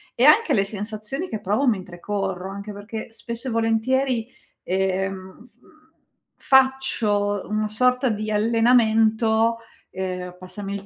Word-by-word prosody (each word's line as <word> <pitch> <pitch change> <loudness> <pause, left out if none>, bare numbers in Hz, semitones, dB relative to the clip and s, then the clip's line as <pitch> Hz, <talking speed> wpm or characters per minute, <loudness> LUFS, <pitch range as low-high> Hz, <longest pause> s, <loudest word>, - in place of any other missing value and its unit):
e 240 - +1
anche 305 +4 +6
le 200 -6 +3
sensazioni 215 - -4
che 215 - -5
provo 210 +8 0
mentre 185 -6 -2
corro. 195 -2 -3
Anche 200 +2 -7
perché 210 +2 -7
spesso 235 +2 -6
e - - -4
volentieri, 230 +2 +1 0.4
ehm, 190 +3 -3 0.9
f - - -19
faccio 235 -7 +3
una 215 0 0
sorta 250 +4 +2
di 215 -2 -2
allenamento, 225 0 +3 0.3
ehm, 180 -1 -5
passami 195 +2 -7
il 200 0 -7
215 Hz, 125 wpm, -23 LUFS, 195-235 Hz, 0.9 s, anche